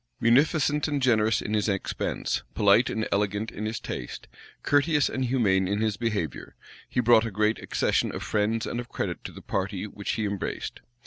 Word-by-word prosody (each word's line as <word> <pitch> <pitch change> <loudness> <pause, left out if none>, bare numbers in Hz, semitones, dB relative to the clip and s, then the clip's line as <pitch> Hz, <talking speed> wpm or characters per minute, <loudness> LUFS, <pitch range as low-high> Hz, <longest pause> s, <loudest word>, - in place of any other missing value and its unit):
Munificent 145 +5 +3
and 145 -2 -1
generous 110 -4 +2
in 105 - -3
his 105 0 +1
expense; 95 -1 -2
polite 105 +4 +4
and 110 0 -2
elegant 105 +2 0
in 105 +1 -4
his 110 +1 -3
taste; 60 - -6 0.4
courteous 145 0 +3
and 130 0 -2
humane 100 -7 +2
in 100 +2 0
his 110 -2 0
behavior; 100 - -3 0.3
he - - -1
brought 120 -2 +5
a - - -3
great 105 +1 +1
accession - - 0
of - - -5
friends 110 +2 0
and 120 - -3
of 120 - -6
credit - - -4
to - - -5
the - - -12
party 95 0 -2
which 100 -1 -4
he 110 - -1
embraced. 100 -1 -4
110 Hz, 185 wpm, -27 LUFS, 100-120 Hz, 0.4 s, brought